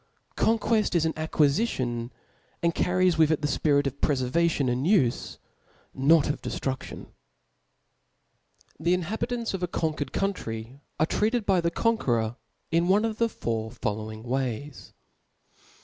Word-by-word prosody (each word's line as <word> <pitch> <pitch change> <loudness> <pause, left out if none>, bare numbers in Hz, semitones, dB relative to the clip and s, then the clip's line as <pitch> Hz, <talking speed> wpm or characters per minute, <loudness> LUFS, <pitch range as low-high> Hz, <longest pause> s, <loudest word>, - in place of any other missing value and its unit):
GDnijueli 220 -2 +2
is 165 -2 +3
an 160 - 0
acquifitiqat 140 - 0 0.5
and 170 0 +2
carries 180 -1 +2
with 160 -1 +5
it 155 -1 +1
tb^ 150 - -1
fyif}t 145 -2 +3
of 140 0 -4
pf 130 -4 +1
efervadon 165 -6 +2
and 130 +5 -1
ufe, 165 - +2 0.6
not 145 +3 +4
of 145 - -2
deftru&]on». 130 -1 -4 1.7
The 170 +3 +2
inhabiunts 230 +6 -3
of 190 - -3
a 180 - 0
conquered 155 -5 -2
pountry 125 - -3 0.2
are 155 - +4
treated 220 +6 0
by 190 -3 +3
the 170 - +1
conqueror 120 - 0 0.3
one 185 +6 +3
of 220 -1 -3
the 230 0 +3
four 110 - -3
following 110 -1 -4
ways. 130 +2 -3
155 Hz, 135 wpm, -27 LUFS, 130-185 Hz, 1.7 s, with